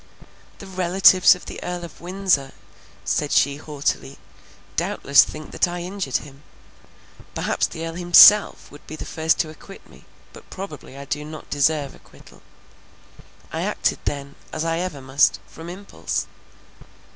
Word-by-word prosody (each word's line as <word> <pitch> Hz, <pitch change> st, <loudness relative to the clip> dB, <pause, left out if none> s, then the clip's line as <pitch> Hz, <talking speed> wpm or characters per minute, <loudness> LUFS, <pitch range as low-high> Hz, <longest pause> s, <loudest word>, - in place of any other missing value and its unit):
"The -, -, -11 dB
relatives 185 Hz, 0 st, +5 dB
of 180 Hz, -, -13 dB
the -, -, -8 dB
Earl 180 Hz, 0 st, -4 dB
of 165 Hz, -, -14 dB
Windsor," 180 Hz, -6 st, 0 dB, 0.5 s
said 150 Hz, -1 st, -1 dB
she 140 Hz, 0 st, +2 dB
haughtily, 145 Hz, -1 st, -3 dB, 0.6 s
"doubtless 140 Hz, 0 st, +4 dB
think 155 Hz, 0 st, -9 dB
that -, -, +1 dB
I 175 Hz, 0 st, -5 dB
injured 180 Hz, -6 st, -2 dB
him; 140 Hz, -1 st, -13 dB, 0.9 s
perhaps -, -, 0 dB
the 165 Hz, 0 st, -7 dB
Earl 165 Hz, -, -5 dB
himself 180 Hz, +4 st, +6 dB
would 145 Hz, -, -15 dB
be 155 Hz, -, -7 dB
the -, -, -8 dB
first 160 Hz, +1 st, 0 dB
to 160 Hz, -, -5 dB
acquit 195 Hz, +5 st, -14 dB
me, -, -, -19 dB, 0.3 s
but -, -, -15 dB
probably 155 Hz, -8 st, -9 dB
I 140 Hz, -, -8 dB
do 145 Hz, +2 st, -3 dB
not 155 Hz, +1 st, -10 dB
deserve 145 Hz, 0 st, +1 dB
acquittal. -, -, -19 dB, 1.1 s
I -, -, -2 dB
acted -, -, -1 dB
then, 140 Hz, -1 st, -4 dB, 0.2 s
as 160 Hz, +1 st, -3 dB
I 165 Hz, 0 st, -1 dB
ever 175 Hz, -6 st, -4 dB
must, 130 Hz, -7 st, +2 dB
from 165 Hz, +1 st, -11 dB
impulse. 195 Hz, +3 st, -4 dB
160 Hz, 150 wpm, -22 LUFS, 145-180 Hz, 1.1 s, himself